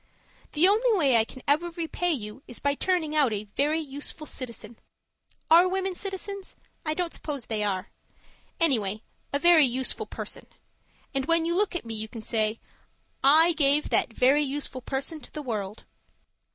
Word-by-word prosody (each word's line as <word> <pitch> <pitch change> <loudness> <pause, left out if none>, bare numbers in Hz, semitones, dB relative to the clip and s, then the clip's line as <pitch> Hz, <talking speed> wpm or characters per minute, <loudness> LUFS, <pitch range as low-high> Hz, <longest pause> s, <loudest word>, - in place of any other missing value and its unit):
The 315 +4 +5
only 440 +2 +3
way 275 -8 +4
I 225 - +5
can 255 +3 -12
ever 310 +5 +2
repay 340 +1 -2
you 225 -4 -5
is 245 - -5
by 285 0 0
turning 320 -1 0
out 285 -6 +3
a 205 0 -3
Very 300 +3 +1
Useful 290 +1 -6
Citizen 235 -5 -6 0.7
(Are 340 +3 +7
women 380 0 -1
citizens? 390 +1 -4 0.3
I 310 -1 -1
don't 350 -1 -2
suppose 285 -6 -4
they 215 -2 -1
are.) 195 -1 -2 0.7
Anyway, 220 - +1 0.3
a 280 - +1
Very 340 0 +6
Useful 260 - -1
Person. - - -5 0.7
And 270 0 -1
when 330 -1 +3
you 340 - 0
look 385 0 +1
at 350 - -3
me 225 - -5
you 220 0 -3
can 220 0 -9
say, 215 0 0 0.6
'I 320 +5 +6
gave 295 -1 +2
that - - +3
Very 265 +6 +4
Useful 280 -2 -3
Person 275 +5 -3
to - - -11
the 300 - -6
world.' 210 -5 -4
290 Hz, 170 wpm, -27 LUFS, 235-335 Hz, 0.7 s, Are